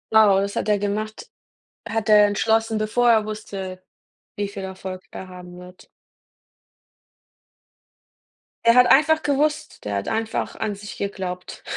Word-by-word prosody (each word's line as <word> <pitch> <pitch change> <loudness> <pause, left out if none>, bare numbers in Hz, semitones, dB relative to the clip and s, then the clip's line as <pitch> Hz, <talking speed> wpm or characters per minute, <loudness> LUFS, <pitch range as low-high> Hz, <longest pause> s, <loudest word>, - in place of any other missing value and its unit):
Oh, 205 -3 +6
das 200 +1 -2
hat - - -2
der 210 -1 +3
gemacht? 210 +2 -4 0.6
Hat 225 -2 -2
er 210 -1 +7
entschlossen, 220 +2 +1
bevor 235 +3 +2
er 220 -2 +3
wusste, 195 -3 -6 0.5
wie 205 -1 -2
viel 200 -1 -7
Erfolg 190 -1 -7
er 190 - -8
haben 180 -1 -11
wird? 180 0 -14 2.8
Er 230 0 +6
hat 250 0 +7
einfach 315 +2 +4
gewusst 295 +1 -1
der 105 -1 -3
hat 100 - -3
einfach 220 0 -2
an 215 -2 -2
sich 205 +1 -9
geglaubt. 185 -2 -5
205 Hz, 140 wpm, -22 LUFS, 190-225 Hz, 2.8 s, er